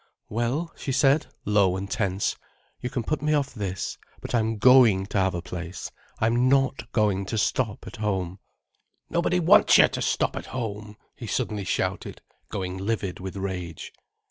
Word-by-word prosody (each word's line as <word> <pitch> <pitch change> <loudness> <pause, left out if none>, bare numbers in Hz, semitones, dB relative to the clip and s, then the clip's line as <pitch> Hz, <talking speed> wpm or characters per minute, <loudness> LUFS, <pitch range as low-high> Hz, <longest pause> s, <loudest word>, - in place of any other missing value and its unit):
"Well," 120 +9 -1
she 135 - -4
said, 135 +3 +3 0.2
low 100 -3 +3
and 95 +1 -4
tense, 100 -2 -1 0.4
"you 125 - -4
can 120 -1 -3
put 155 +6 -2
me 150 0 +2
off 140 -2 -1
this, 95 -5 -4 0.2
but - - -7
I'm 110 -2 +1
going 115 -5 +6
to 100 - -1
have 95 -1 +1
a 85 - -4
place. 90 -1 -6 0.3
I'm 120 +3 +2
not 135 -3 +1
going 105 -4 +1
to 110 - -2
stop 110 0 0
at - - -9
home." 95 -4 -2 0.7
"Nobody 170 +1 +1
wants 180 +5 +6
you - - +8
to - - -4
stop - - 0
at - - -6
home," 105 -3 -5 0.2
he - - -8
suddenly 105 -2 -2
shouted, - - -2 0.3
going 90 -1 -4
livid 100 -2 -2
with 95 +1 -6
rage. 95 -4 -5
105 Hz, 170 wpm, -26 LUFS, 95-125 Hz, 0.7 s, you